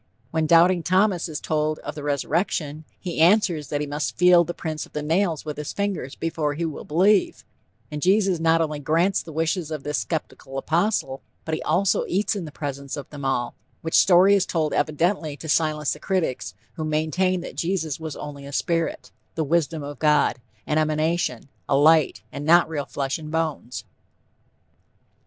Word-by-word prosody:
When 160 -1 0
doubting 170 +2 +5
Thomas 185 0 +2
is 150 - -4
told 155 0 -1
of - - -7
the 150 - -7
resurrection, 150 +1 -1
he 175 -3 -5
answers 170 -4 +3
that 145 +1 -2
he - - -1
must 145 +1 -3
feel 180 -1 +6
the 170 - -4
prints 155 -2 -5
of - - -29
the 150 - -3
nails 165 0 0
with 150 -1 -5
his 150 -1 -5
fingers 195 -9 -3
before 160 -3 -2
he 170 +3 -2
will 160 - -5
believe, 190 +6 +2 0.5
and 150 0 -4
Jesus 190 -1 +3
not 165 0 +3
only 155 -2 -2
grants 165 +7 +1
the 165 - -10
wishes 160 +1 -1
of 155 -3 -5
this 150 0 -1
skeptical 140 -4 -5
apostle, 160 -2 0 0.2
but 160 - -3
he 155 - -1
also 190 +2 +2
eats 205 +4 0
in 190 -4 -4
the 150 - -8
presence 140 -1 -5
of 140 - -7
them 145 -2 -8
all, 125 -3 -1 0.3
which 160 - -4
story 190 +2 +6
is 200 -1 +2
told 155 -3 0
evidently 155 -1 0
to 160 - -9
silence 155 -1 +1
the 150 - -10
critics 175 -8 -2 0.2
who 160 - -5
maintained 160 +4 0
that - - -8
Jesus 165 -5 -2
was 160 -2 -6
only 145 -1 -8
a - - -8
spirit, 165 +3 -1 0.2
"the 160 - 0
Wisdom 160 0 0
of 145 -1 -7
God," 150 -4 +2 0.2
an 150 - +1
emanation, 155 -4 0 0.2
a 135 - +4
light, 155 0 +4
and 140 - -6
not 170 +3 +5
real 150 -3 -3
flesh 135 +2 -2
and 155 -1 -8
bones. 155 -8 -3
160 Hz, 185 wpm, -24 LUFS, 150-175 Hz, 0.5 s, feel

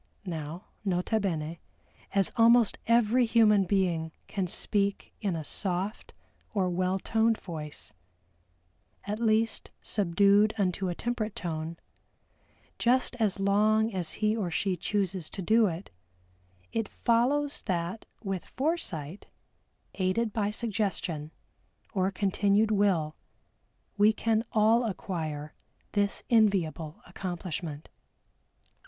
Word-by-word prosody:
Now, 165 +1 -5 0.2
nota 190 +3 +1
bene 165 -5 -2 0.6
as 195 -2 +3
almost 230 -1 +5
every 235 +1 +4
human 215 -4 +5
being 175 -4 +1
can 195 -3 -2
speak 200 +2 -1
in 195 -5 0
a 160 - -3
soft 185 +6 -3 0.4
or 185 -3 +1
well 185 +1 +1
toned 225 +3 +2
voice, 155 -4 -7 1.1
"at 210 +2 -3
least, 225 0 +1
subdued 200 +2 +3
unto 190 -1 0
a 175 - -2
temperate 225 -2 -2
tone" 165 -1 -4 1.0
just 250 +1 +2
as 210 -5 0
long 215 +3 +3
as 180 -4 -2
he 215 0 +1
or 205 -6 -1
she 185 +3 0
chooses 190 -2 -2
to 195 - -6
do 220 +3 +4
it, 170 +1 -5 0.8
it 225 -2 0
follows 275 +5 +1
that 180 +2 -2 0.2
with 195 -3 -2
foresight, 205 - -3 0.7
aided 200 +4 0
by 205 -2 0
suggestion, 200 -8 -2 0.6
or 190 -2 +2
continued 200 +2 +2
will, 190 -7 +2 0.8
we 210 +1 +7
can 225 0 +1
all 225 +2 +4
acquire 160 -8 -4 0.4
this 205 -1 0
enviable 180 -8 +2
accomplishment. 175 -4 -5
200 Hz, 110 wpm, -29 LUFS, 175-220 Hz, 1.1 s, we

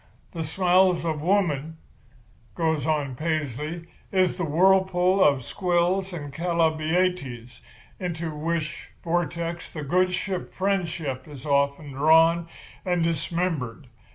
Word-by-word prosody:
The 165 -2 -4
smiles 180 +2 +3
of 155 -2 -1
woman,' 160 -4 0 0.8
goes 160 -3 0
on 145 -4 0
Paisley, 155 +2 -3 0.3
'is 185 -2 +2
the 180 - -3
whirlpool 185 +3 +3
of 140 -3 +3
Squills 180 +4 0
and 145 -5 -7
Chalybeates, 160 -6 0 0.4
into 170 -3 -4
which 160 +1 -3
vortex 170 0 -2
the 150 - -6
good 180 +5 +2
ship 185 0 -3
Friendship 170 -9 -2
is 145 -3 -10
often 140 0 +1
drawn 165 +4 +4 0.4
and 180 -2 +1
dismembered. 165 -6 -2
165 Hz, 110 wpm, -25 LUFS, 150-180 Hz, 0.8 s, drawn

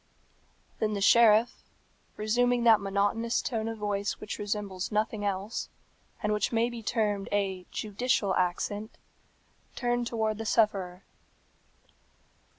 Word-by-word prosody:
Then 215 -1 0
the 205 - -2
sheriff, 225 +2 +5 0.6
resuming 245 +3 +1
that 225 -3 +6
monotonous 200 +4 0
tone 225 -2 -2
of 225 0 -4
voice 205 -1 -1
which 210 - -6
resembles 205 -2 -3
nothing 215 0 -1
else, 200 +2 -3 0.5
and 210 0 +1
which 210 - 0
may 230 +1 +1
be 235 -1 -7
termed 210 -3 -1
a 195 -3 -1
judicial 210 -2 0
accent, 205 +4 -2 0.8
turned 240 -1 0
towards 220 -2 -1
the 225 - -4
sufferer. 195 -5 +1
210 Hz, 120 wpm, -29 LUFS, 200-230 Hz, 0.8 s, that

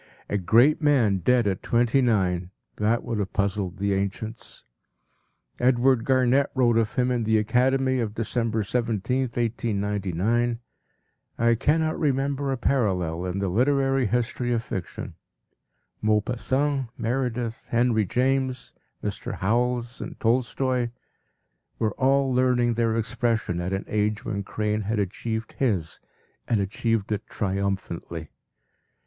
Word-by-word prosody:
A 105 - 0
great 120 - +4
man 130 -10 +3
dead 120 +6 +2
at 95 -2 -1
twenty 120 +3 +2
nine! 95 -7 +1 0.3
That 110 +3 +1
would 115 -3 -3
have 100 -2 -3
puzzled 100 -2 -1
the 100 0 0
ancients. 100 +3 -4 1.0
Edward 125 -1 +3
Garnett 130 +1 +3
wrote 120 -3 +4
of 110 -2 -1
him 125 0 +2
in 120 -2 0
The 110 0 +3
Academy 130 +4 +2
of 110 -3 -2
December 115 -1 -1
17, 120 +3 -1
1899: 110 -1 -1 0.8
“I 115 0 +4
cannot 155 +6 +1
remember 140 -1 0
a 135 - -1
parallel 90 -10 0
in 90 +1 -3
the 100 0 -1
literary 135 +4 +2
history 120 +2 -1
of 115 -1 0
fiction. 95 -5 -6 0.9
Maupassant, 125 +6 0
Meredith, 120 -1 -2
Henry 115 -2 +2
James, 130 +2 0 0.3
Mr. - - -4
Howells 120 +4 0
and - - -7
Tolstoy, 125 +1 +1 0.9
were 110 -2 0
all 135 0 +3
learning 125 -1 +3
their 115 -1 +1
expression 115 -5 -1
at 90 +2 -3
an 95 +1 -2
age 105 0 -1
where 100 -3 -2
Crane 105 +1 -2
had 110 +2 -2
achieved 110 +3 -3
his 100 - 0 0.5
and 115 - +2
achieved 105 +2 -1
it 105 +1 -2
triumphantly. 95 -5 -3
115 Hz, 125 wpm, -25 LUFS, 105-125 Hz, 1.0 s, great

